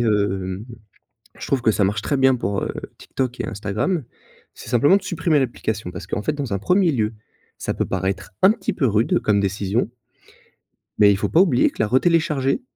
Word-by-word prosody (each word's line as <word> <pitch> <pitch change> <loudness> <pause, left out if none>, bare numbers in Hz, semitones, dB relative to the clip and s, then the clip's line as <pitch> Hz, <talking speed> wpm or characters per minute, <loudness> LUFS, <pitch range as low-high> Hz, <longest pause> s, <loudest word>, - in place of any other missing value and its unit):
hem, 100 -3 0 0.7
je - - -7
trouve 135 -3 +1
que 110 - +3
ça 105 - +1
marche 100 +3 0
très 140 - -1
bien 130 -1 +4
pour, 100 -4 -2
heu, - - -3 0.2
TikTok 125 -2 -4
et 110 - -4
Instagram. 115 - -2 0.5
C'est - - -11
simplement 135 - +5
de - - -6
supprimer 165 -4 +1
l'application 110 -7 -3
parce 85 - -8
qu'en 105 - -3
fait 155 - 0
dans 140 -8 -4
un 100 - -1
1er 180 - +3
lieu, 110 -4 -1 0.4
ça - - -3
peut - - -1
paraître 95 +1 -3
un 190 - +8
petit 220 - -3
peu 135 - +1
rude 110 +2 +2
comme 105 -1 +2
décision 100 +3 -1 1.1
mais 100 -1 +6
il 100 - +1
faut - - -1
pas 170 - +5
oublier 145 -10 +3
que - - -5
la 110 - +2
re-télécharger, 140 - +2
115 Hz, 200 wpm, -21 LUFS, 100-145 Hz, 1.1 s, un